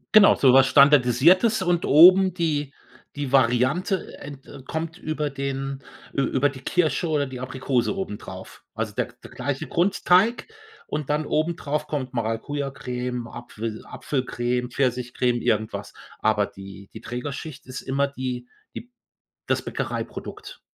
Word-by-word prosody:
Genau, 210 Hz, -1 st, +8 dB
so 130 Hz, -2 st, +5 dB
was 135 Hz, 0 st, +6 dB
Standardisiertes 150 Hz, -, +5 dB
und 175 Hz, -2 st, +1 dB
oben 185 Hz, +5 st, +7 dB
die 150 Hz, -5 st, -1 dB, 0.4 s
die 140 Hz, -3 st, -3 dB
Variante, 130 Hz, -, +2 dB
äh, -, -, -9 dB
n 140 Hz, -2 st, -9 dB
de 135 Hz, -1 st, -13 dB
kommt 160 Hz, +4 st, -4 dB
über 155 Hz, -2 st, -3 dB
den 135 Hz, 0 st, -4 dB, 0.3 s
ü 140 Hz, -, 0 dB
über 140 Hz, +2 st, +2 dB
die 135 Hz, -1 st, -10 dB
Kirsche 170 Hz, +2 st, 0 dB
oder 145 Hz, -2 st, +1 dB
die 130 Hz, -1 st, -8 dB
Aprikose 130 Hz, +4 st, -1 dB
obendrauf, 190 Hz, -, -7 dB
also -, -, -3 dB
der -, -, -1 dB, 0.2 s
der -, -, -12 dB
gleiche 145 Hz, +2 st, -3 dB
Grundteig 190 Hz, +4 st, +2 dB, 0.4 s
und 150 Hz, -2 st, -4 dB
dann 150 Hz, +1 st, 0 dB
obendrauf 155 Hz, -2 st, -1 dB
kommt 130 Hz, -4 st, -4 dB
Maracujacreme, 125 Hz, +1 st, -3 dB
Apfel 115 Hz, -2 st, -7 dB
Apfelcreme, 125 Hz, -2 st, -2 dB
Pfirsichcreme, 125 Hz, -1 st, 0 dB
irgendwas. 110 Hz, 0 st, -1 dB, 0.3 s
Aber 105 Hz, -2 st, +2 dB
die 95 Hz, 0 st, -12 dB
die -, -, -8 dB
Trägerschicht 140 Hz, +4 st, -6 dB
ist 130 Hz, 0 st, -7 dB
immer 140 Hz, +1 st, 0 dB
die 130 Hz, -3 st, -5 dB, 0.3 s
die 245 Hz, +2 st, -8 dB, 0.5 s
das -, -, 0 dB
Bäckereiprodukt. -, -, -6 dB
135 Hz, 135 wpm, -24 LUFS, 125-155 Hz, 0.5 s, Genau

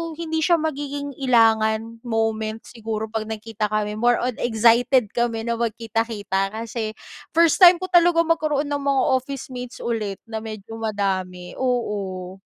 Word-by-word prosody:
hindi 320 Hz, -1 st, -3 dB
siya 345 Hz, +2 st, +4 dB
magiging 290 Hz, -2 st, -3 dB
ilangan 225 Hz, -3 st, +2 dB
moments 225 Hz, -1 st, -2 dB
siguro 220 Hz, -1 st, -4 dB
pag 220 Hz, -1 st, -3 dB
nagkita 220 Hz, -1 st, -3 dB
kami 210 Hz, 0 st, -2 dB
more 240 Hz, +1 st, +4 dB
on 250 Hz, -, 0 dB
excited 235 Hz, 0 st, +3 dB
kami 235 Hz, -2 st, -1 dB
na 235 Hz, 0 st, -2 dB
magkita-kita 220 Hz, -3 st, -2 dB
kasi 220 Hz, -1 st, -4 dB, 0.4 s
first 335 Hz, +1 st, +4 dB
time 360 Hz, -1 st, +9 dB
ko 370 Hz, -, -4 dB
talagang 335 Hz, -1 st, +4 dB
magkaroon 305 Hz, -3 st, +1 dB
ng 285 Hz, -, 0 dB
mga 275 Hz, -1 st, +1 dB, 0.2 s
officemates 255 Hz, -2 st, -7 dB
ulit 215 Hz, -4 st, -2 dB
na 225 Hz, -1 st, -5 dB
medyo 220 Hz, 0 st, -8 dB
madami. 190 Hz, -4 st, -2 dB
Oo. 195 Hz, -7 st, -2 dB
225 Hz, 140 wpm, -23 LUFS, 215-265 Hz, 0.4 s, time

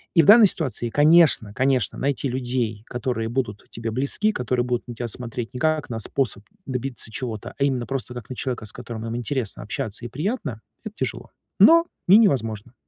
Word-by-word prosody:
И 165 Hz, -, +7 dB
в -, -, 0 dB
данной 215 Hz, +1 st, +9 dB
ситуации, 130 Hz, -9 st, -2 dB
конечно, 150 Hz, -6 st, +4 dB
конечно 130 Hz, -3 st, +1 dB
найти 140 Hz, 0 st, -1 dB
людей, 120 Hz, -4 st, -2 dB
которые 120 Hz, -3 st, -2 dB
будут 115 Hz, -4 st, -3 dB
тебе 115 Hz, 0 st, -5 dB
близки, 140 Hz, -, +1 dB
которые 125 Hz, -, -1 dB
будут 125 Hz, 0 st, -2 dB
на 120 Hz, -, -7 dB
тебя 120 Hz, +1 st, -4 dB
смотреть 120 Hz, 0 st, -6 dB
не 125 Hz, -, -5 dB
как 155 Hz, 0 st, 0 dB
на 115 Hz, -2 st, -3 dB
способ 110 Hz, -3 st, -2 dB, 0.2 s
добиться 125 Hz, -3 st, -4 dB
чего-то, 115 Hz, -1 st, -5 dB
а -, -, +2 dB
именно 130 Hz, -4 st, 0 dB
просто 130 Hz, +1 st, -4 dB
как 120 Hz, -4 st, -9 dB
на 130 Hz, -, -5 dB
человека, 125 Hz, -3 st, -3 dB
с 105 Hz, -, -4 dB
которым 115 Hz, -1 st, -7 dB
им 115 Hz, 0 st, -4 dB
интересно 120 Hz, -2 st, -2 dB
общаться 105 Hz, +2 st, -4 dB
и -, -, -2 dB
приятно, 150 Hz, -, -3 dB, 0.2 s
это 215 Hz, -2 st, -7 dB
тяжело, -, -, -4 dB, 0.3 s
но 335 Hz, +1 st, +7 dB, 0.2 s
не 190 Hz, +4 st, +8 dB
невозможно. 120 Hz, -, +1 dB
125 Hz, 190 wpm, -23 LUFS, 115-140 Hz, 0.3 s, данной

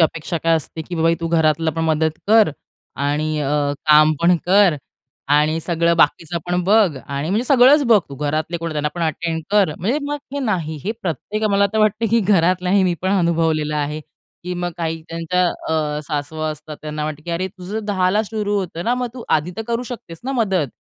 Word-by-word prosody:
अपेक्षा 165 Hz, +1 st, 0 dB
काय 165 Hz, 0 st, +3 dB
असते, 160 Hz, +1 st, -5 dB
की 175 Hz, -, -7 dB
बा 160 Hz, -, -1 dB
बाई 165 Hz, 0 st, +4 dB
तू 165 Hz, -, -2 dB
घरातली 160 Hz, -1 st, +2 dB
पण 165 Hz, -, 0 dB
मदत 160 Hz, 0 st, 0 dB
कर 220 Hz, -3 st, +5 dB, 0.5 s
आणि 150 Hz, +2 st, -1 dB
अ, 145 Hz, 0 st, 0 dB
काम 155 Hz, +1 st, +6 dB
पण 175 Hz, +1 st, +4 dB
कर 190 Hz, -4 st, +5 dB, 0.6 s
आणि 155 Hz, +2 st, +3 dB
सगळं 170 Hz, 0 st, +1 dB
बाकीचं 165 Hz, +1 st, +2 dB
पण 180 Hz, 0 st, 0 dB
बघ 200 Hz, -7 st, +3 dB
आणि 140 Hz, +2 st, -3 dB
म्हणजे 220 Hz, +5 st, +1 dB
सगळंच 275 Hz, +3 st, +6 dB
बघ 225 Hz, -3 st, +6 dB
तू. 140 Hz, -, -8 dB
घरातले 155 Hz, +4 st, -2 dB
कोण 165 Hz, 0 st, -4 dB
आहे -, -, -5 dB
त्यांना 150 Hz, 0 st, 0 dB
पण 170 Hz, -, -3 dB
अटेंड 160 Hz, 0 st, -2 dB
कर. 200 Hz, -7 st, +3 dB
म्हणजे 235 Hz, -, 0 dB
मग 290 Hz, 0 st, -3 dB, 0.2 s
हे -, -, -1 dB
नाही 165 Hz, -7 st, -2 dB
हे 215 Hz, -, -1 dB
प्रत्येक, 200 Hz, -, -3 dB
मला 200 Hz, 0 st, +3 dB
तर 220 Hz, -, 0 dB
वाटतं, 215 Hz, +1 st, +2 dB
की 230 Hz, 0 st, +4 dB
घरातलाही 185 Hz, 0 st, +2 dB
मी 175 Hz, -1 st, +1 dB
पण 190 Hz, -, 0 dB
अनुभवलेलं 165 Hz, -5 st, +1 dB
आहे, 150 Hz, +1 st, -2 dB, 0.4 s
की 180 Hz, 0 st, -3 dB
मग 175 Hz, 0 st, -3 dB
काही 165 Hz, -1 st, -3 dB
त्यांच्या 165 Hz, +2 st, 0 dB, 0.2 s
अ, 150 Hz, -2 st, -1 dB
सासवा 155 Hz, +1 st, -3 dB
असतात. 150 Hz, 0 st, -8 dB
त्यांना 150 Hz, 0 st, -4 dB
वाटतं, 155 Hz, 0 st, -5 dB
की 170 Hz, -, -6 dB
अरे, 185 Hz, +3 st, -2 dB
तुझं 195 Hz, +3 st, -6 dB
10ला 200 Hz, +1 st, +1 dB
सुरू 210 Hz, -1 st, -2 dB
होतं 175 Hz, -2 st, -5 dB
ना, 245 Hz, -, +2 dB
मग 250 Hz, 0 st, -2 dB
तू 245 Hz, -, -8 dB
आधी 155 Hz, +4 st, -6 dB
तर 225 Hz, -, -3 dB
करू 235 Hz, +1 st, -1 dB
शकतेस 165 Hz, -8 st, -10 dB
ना 270 Hz, -, -2 dB
मदत? 195 Hz, -, +1 dB
170 Hz, 210 wpm, -20 LUFS, 155-200 Hz, 0.6 s, काम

